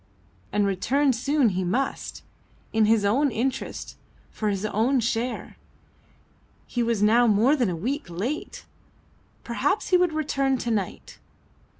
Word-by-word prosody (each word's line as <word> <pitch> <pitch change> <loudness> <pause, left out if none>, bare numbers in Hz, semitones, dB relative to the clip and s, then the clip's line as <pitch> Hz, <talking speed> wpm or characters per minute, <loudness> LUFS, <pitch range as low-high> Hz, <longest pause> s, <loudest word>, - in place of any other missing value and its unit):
And 205 -1 +2
return 260 +9 +1
soon 275 +1 +2
he 185 -1 -2
must 245 +10 -2 0.5
in 220 -1 +4
his 215 -1 +3
own 270 +8 +3
interest, 260 +3 -3 0.3
for 215 - -2
his 200 0 -2
own 230 +6 +1
share. 235 +2 -2 1.1
He 245 - -2
was 230 -3 +1
now 235 +3 +5
more 225 +7 +4
than 245 -8 +1
a 175 - -2
week 265 - -3
late! 230 - -4 0.8
Perhaps 390 - -1
he 365 - +5
would 355 -2 +2
return 275 -3 0
to 240 -1 -3
night. 205 -4 -4
235 Hz, 135 wpm, -25 LUFS, 210-275 Hz, 1.1 s, now